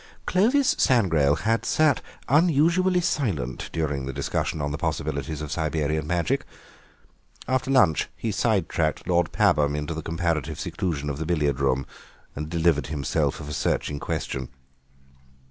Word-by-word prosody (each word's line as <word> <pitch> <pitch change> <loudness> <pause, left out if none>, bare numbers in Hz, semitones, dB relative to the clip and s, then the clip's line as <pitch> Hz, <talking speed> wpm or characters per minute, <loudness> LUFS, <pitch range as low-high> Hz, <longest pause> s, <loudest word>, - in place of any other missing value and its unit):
Clovis 250 +9 +3
Sangrail 80 - +3
had 115 +1 +1
sat 155 -3 +2 0.3
unusually 170 +5 +3
silent 90 - -2
during 70 -4 -2
the - - -2
discussion 70 +3 -2
on 75 0 -2
the 75 - -3
possibilities 75 +1 -2
of 75 - -6
Siberian 75 -1 -1
Magic; 85 -1 0 1.0
after 130 0 0
lunch 125 - +3
he 115 - -3
side 100 -5 +1
tracked 80 -2 -1
Lord 85 -1 +2
Pabham 75 -1 +2
into 75 +2 -3
the 80 - -4
comparative 80 -2 -2
seclusion 80 -4 -3
of 70 0 -3
the 80 - -2
billiard 75 -5 +1
room 70 -1 +1 0.5
and 75 +2 -5
delivered 80 -5 +1
himself 70 -3 -1
of - - -8
a 75 - -5
searching 75 0 -1
question. 65 -2 -3
80 Hz, 145 wpm, -25 LUFS, 75-110 Hz, 1.0 s, Clovis